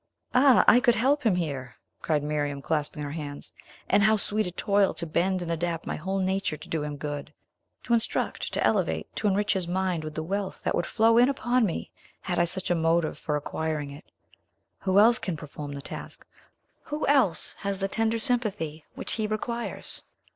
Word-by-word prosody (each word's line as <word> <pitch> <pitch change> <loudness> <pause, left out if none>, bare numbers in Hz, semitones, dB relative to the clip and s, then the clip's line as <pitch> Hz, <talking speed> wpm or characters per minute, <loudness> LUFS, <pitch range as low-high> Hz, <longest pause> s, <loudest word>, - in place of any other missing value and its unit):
"Ah, 260 0 +6
I 245 - +8
could 240 -2 +4
help 275 +6 +2
him 220 -8 +2
here!" 140 -8 -3 0.3
cried 150 -3 0
Miriam, 145 -1 -1
clasping 150 0 -2
her 145 - -4
hands. 145 -2 -7 0.3
"And 200 - +4
how 215 +1 +5
sweet 210 0 +1
a - - -4
toil 200 +2 +2
to 170 - -2
bend 180 +3 0
and 170 - -4
adapt 165 0 -2
my - - -3
whole 190 +5 -3
nature 190 -4 0
to - - -11
do 160 - -2
him 150 -1 -4
good! 145 0 -5 0.5
To 240 - 0
instruct, 230 -1 0
to - - 0
elevate, - - 0
to 215 - +1
enrich 205 +1 +2
his 185 -3 -2
mind 180 -2 -1
with 155 0 -6
the 160 - -2
wealth 195 +3 -3
that - - 0
would 175 - 0
flow 230 +1 +4
in 245 +2 +6
upon 250 -3 +1
me, 170 - -4 0.3
had 180 -2 -2
I 175 - +4
such 180 +1 +2
a - - +5
motive 165 0 +1
for 150 - -2
acquiring 150 0 -3
it! 140 +2 -11 0.7
Who 190 0 +1
else 225 +3 +6
can 180 -5 -3
perform 145 -1 -7
the 140 -1 -7
task? - - -8 0.6
Who 300 +1 -2
else 265 - +3
has 200 -1 -2
the 195 - 0
tender 225 +3 0
sympathy 210 - -1
which - - -3
he 220 -1 0
requires? 235 +2 -4
185 Hz, 200 wpm, -27 LUFS, 155-215 Hz, 0.7 s, I